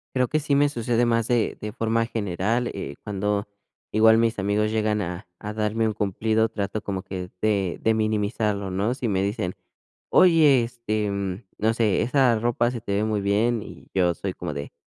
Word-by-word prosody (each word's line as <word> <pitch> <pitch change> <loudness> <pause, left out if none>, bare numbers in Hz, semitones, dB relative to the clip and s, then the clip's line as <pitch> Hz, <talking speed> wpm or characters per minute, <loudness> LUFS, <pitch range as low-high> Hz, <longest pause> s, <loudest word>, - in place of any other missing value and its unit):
Creo 125 -1 +2
que 155 - 0
sí 145 -1 0
me 145 +1 +4
sucede 120 -1 0
más 115 -1 +1
de 120 -3 +1
de 105 0 -4
forma 115 -1 0
general, 110 +3 -1
eh, 70 - -6
cuando 105 0 -1 0.4
igual 110 +1 +6
mis 115 -2 +1
amigos 105 +2 +1
llegan 110 -1 0
a 90 +1 -5
a 105 0 -5
darme 110 +1 0
un 110 - -1
cumplido, 110 +3 0
trato 100 -1 -3
como 95 -2 -4
que 90 -2 -6
de 100 -4 0
de 110 - +3
minimizarlo, 105 -2 -1
¿no?, 100 +6 0
si 125 -4 -3
me 95 -2 +1
dicen: 100 -2 -2 0.6
"Oye, 155 -8 +6
este, 110 -3 -2
mm, 100 +1 -3 0.2
no 110 +1 +2
sé, 110 -4 +2
esa 125 -2 +3
ropa 120 +1 +1
se 120 -3 -5
te 100 - -5
ve 105 - +1
muy 110 -2 0
bien", 105 +3 +1
y - - -12
yo 90 -2 +2
soy 95 +1 -4
como 85 -5 -5
de: 70 0 -6
110 Hz, 195 wpm, -24 LUFS, 100-115 Hz, 0.6 s, igual